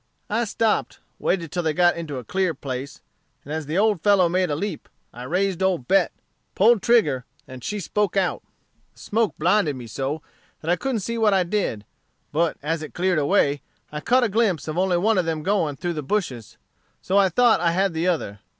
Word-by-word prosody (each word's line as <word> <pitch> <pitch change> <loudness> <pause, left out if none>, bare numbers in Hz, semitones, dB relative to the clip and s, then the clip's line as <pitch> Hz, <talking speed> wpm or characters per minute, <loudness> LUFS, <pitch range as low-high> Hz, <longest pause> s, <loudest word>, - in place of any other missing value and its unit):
I 230 +3 +1
stopped, 225 0 0 0.2
waited 165 -4 -1
till 175 +1 -1
they 160 -2 0
got 175 +1 +4
into 155 -5 -5
a 125 - -6
clear 185 - -1
place, 135 -1 -6 0.4
and 145 - -6
as 160 -2 -4
the 155 +4 -2
old 210 -4 +2
fellow 200 -3 +4
made 180 +1 +1
a 145 - 0
leap, 185 +1 -5 0.2
I 120 - -9
raised 185 +5 0
old 180 -10 0
Bet, 195 -2 +3 0.4
pulled 220 +1 +5
trigger, 155 - +3 0.2
and 130 -1 -10
she 210 - -3
spoke 200 +1 -1
out. 190 -2 +1 0.5
The - - -22
smoke 220 0 0
blinded 175 -2 +2
me 125 -2 -8
so, 135 +7 -4 0.4
that 165 - -1
I - - +4
couldn't 255 0 -2
see 230 +4 -3
what 210 -3 +4
I 190 - +3
did; 170 - -2 0.5
but 165 +2 0
as 160 +2 -1
it 155 - -9
cleared 180 -2 +1
away, 145 -3 +2 0.3
I 150 - -4
caught 250 +10 +3
a - - +3
glimpse 200 -7 +1
of 155 - -3
only 180 0 +2
one 205 +2 +2
of 180 - 0
them 160 -2 -2
going 175 -6 0
through 175 +4 -3
the 155 - -4
bushes; 135 - -3 0.5
so 195 +2 +2
I 195 -1 +4
thought 240 +5 +4
I 170 - +3
had 190 +2 +1
the 165 +2 -1
other. 125 - -1
175 Hz, 210 wpm, -23 LUFS, 150-200 Hz, 0.5 s, pulled